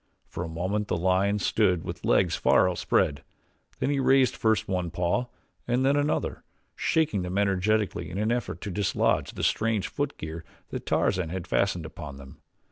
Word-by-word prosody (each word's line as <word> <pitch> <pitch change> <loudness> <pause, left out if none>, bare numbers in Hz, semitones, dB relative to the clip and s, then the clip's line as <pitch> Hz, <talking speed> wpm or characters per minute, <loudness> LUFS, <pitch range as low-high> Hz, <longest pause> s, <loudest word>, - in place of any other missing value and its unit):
For 90 - -5
a - - -4
moment 95 +6 -2
the - - 0
lion 95 +4 +2
stood 95 -5 +2
with - - -6
legs - - +3
far - - +4
outspread, 85 -4 +1 0.5
then 140 - 0
he 140 - +1
raised 135 -1 +4
first 110 -1 +1
one 90 -3 -1
paw 90 +9 0 0.4
and 125 +2 +1
then 140 +1 +4
another, 145 +1 -1 0.3
shaking 150 - +1
them 90 +2 -3
energetically 100 -2 +1
in 90 - -6
an 110 +2 +1
effort 120 -8 -2
to 100 - -4
dislodge 100 +1 +1
the - - -5
strange 110 -2 +1
footgear 85 - -4 0.3
that - - -6
Tarzan 90 -4 +1
had 90 0 -4
fastened 90 -3 0
upon 80 -3 -8
them. 70 -1 -13
95 Hz, 170 wpm, -27 LUFS, 90-110 Hz, 0.5 s, far